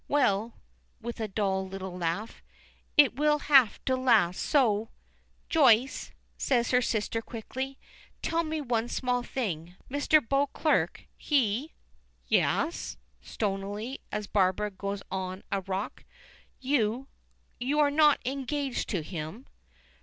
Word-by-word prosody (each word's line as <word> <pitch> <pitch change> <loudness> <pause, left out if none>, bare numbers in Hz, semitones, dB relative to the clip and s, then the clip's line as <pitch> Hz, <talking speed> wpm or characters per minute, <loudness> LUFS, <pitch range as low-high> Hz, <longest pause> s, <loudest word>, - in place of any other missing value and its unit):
Well," 230 -6 +1 0.4
with 235 0 -6
a 220 - -1
dull 190 -2 -1
little 190 -1 -6
laugh, 180 +5 -3 0.6
"it 280 -6 +6
will 300 +1 +3
have 270 -7 +4
to 260 - +2
last, 225 -9 +3
so 225 -6 +2 0.3
" - - -39
"Joyce," 265 -4 +3 0.3
says 240 -3 +1
her 250 0 +4
sister, 225 -1 -1
quickly, 260 +4 -6 0.5
"tell 335 0 +1
me 315 -1 -3
one 235 -4 0
small 245 0 0
thing. 180 -10 -4 0.2
Mr. 290 +2 +4
Beauclerk 285 +3 +1
he 270 +1 0 0.2
" - - -39
"Yes?" 330 - -1 0.2
stonily, 205 +4 -3
as 210 0 -2
Barbara 200 +1 +1
goes 200 +1 -5
on 185 0 -4
a 195 - 0
rock. 190 +2 -4 0.6
"You 255 -1 0 0.5
you 275 +5 0
are 290 -1 +4
not 300 0 +5
engaged 275 0 -2
to 180 -7 -1
him?" 165 - -6
235 Hz, 125 wpm, -29 LUFS, 200-275 Hz, 0.6 s, it